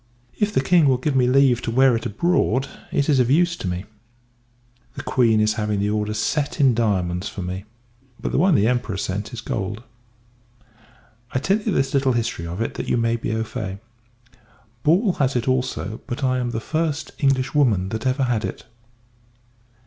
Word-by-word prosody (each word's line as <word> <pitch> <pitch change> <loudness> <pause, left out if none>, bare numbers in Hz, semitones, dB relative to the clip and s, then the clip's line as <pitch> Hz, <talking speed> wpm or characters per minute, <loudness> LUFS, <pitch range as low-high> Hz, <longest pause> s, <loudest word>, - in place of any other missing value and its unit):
If 210 0 +1
the 130 - +1
King 165 0 +4
will 130 -2 +3
give 135 +2 -1
me 125 -2 +4
leave 130 -2 +4
to - - -3
wear 130 +1 +4
it 115 +1 -2
abroad, 135 - +1 0.2
it 140 - +1
is 145 -4 +3
of 125 -1 +3
use 170 +4 +3
to 95 - -5
me. 90 +2 -3 1.1
The - - -6
Q 125 - +2
n 110 - +3
is 110 0 +3
having 105 -1 -1
the 100 +1 0
order 105 0 -1
set 140 +7 -1
in 135 -3 +5
diamonds 95 -5 0
for 95 - -6
me; 95 +2 -5 0.5
but - - -3
the - - +1
one 180 0 +4
the 105 - +3
Emperor 120 -5 -1
sent 100 +3 -3
is 120 -3 -6
gold. 105 +4 -4 1.5
I - - +1
tell 195 +10 +1
you 215 - -1
this 135 -6 0
little 135 -2 +2
history 110 -8 -2
of 85 +6 -5
it, 115 - -2
that - - -5
you - - +2
may 115 0 +1
be 115 - -3
au 110 0 -1
fait. 105 -4 -5 1.0
Ball 180 - +3
has 135 -2 +1
it 120 0 -1
also, 125 -5 -1
but 130 +1 -4
I 130 -1 +1
am 125 -1 -1
the 115 - -3
first 155 +3 -2
Englishwoman 130 -7 +2
that 110 +5 -3
ever 130 +1 +1
had 120 -4 0
it. - - -5
125 Hz, 195 wpm, -22 LUFS, 105-135 Hz, 1.5 s, in